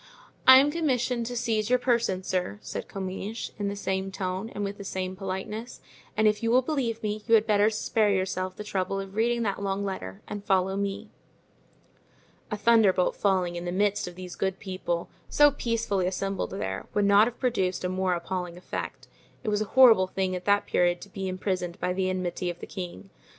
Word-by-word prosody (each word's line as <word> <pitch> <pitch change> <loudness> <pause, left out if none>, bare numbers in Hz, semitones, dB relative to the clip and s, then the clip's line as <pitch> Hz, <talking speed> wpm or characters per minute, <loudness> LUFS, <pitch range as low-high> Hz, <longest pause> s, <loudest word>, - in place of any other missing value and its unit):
"I 260 0 +11
am 280 +2 +5
commissioned 255 -7 0
to 245 0 -4
seize 225 -2 0
your 250 - +5
person, 235 -7 +1
sir," 185 +2 -2
said - - -5
Comminges, 195 +3 -5
in 205 - -1
the 200 - -2
same 190 -1 -2
tone 190 +2 -3
and 205 - -5
with 200 +1 -4
the - - -6
same 185 -1 -3
politeness; 195 +5 -5 0.4
"and 215 0 +4
if 210 +1 +2
you 230 - 0
will 255 +2 +4
believe 240 -6 -2
me 210 0 -2
you 230 - +6
had 215 -1 +4
better 210 -1 +4
spare 215 0 +1
yourself 185 -1 -1
the 210 - -6
trouble 195 -1 -2
of 195 0 -7
reading 235 +2 +1
that 200 -2 -2
long 200 0 -1
letter 95 - -6
and 205 -1 -6
follow 190 -1 +2
me." 200 0 -3 1.4
A 210 - -2
thunderbolt 210 -4 +4
falling 185 -3 +1
in 175 0 -5
the 175 - -2
midst 200 +1 +1
of 175 - -8
these 180 -1 -8
good 190 -1 -1
people, 185 -3 -3 0.2
so 295 0 +6
peacefully 230 -8 -1
assembled 195 +1 -2
there, 195 - -4
would 205 -1 +3
not 200 +2 +6
have 240 - -6
produced 190 -9 0
a - - +1
more 185 0 0
appalling 175 0 -4
effect. 180 - -6 0.4
It 220 - -1
was 210 0 +1
a - - 0
horrible 225 -5 +6
thing 185 0 -1
at 180 - -6
that 205 0 +3
period 175 0 +2
to 200 - -10
be 190 0 -4
imprisoned 185 -1 -3
by 180 - 0
the 185 0 0
enmity 180 -1 -2
of 175 - -6
the - - -7
king. 190 +1 -7
195 Hz, 205 wpm, -27 LUFS, 185-220 Hz, 1.4 s, I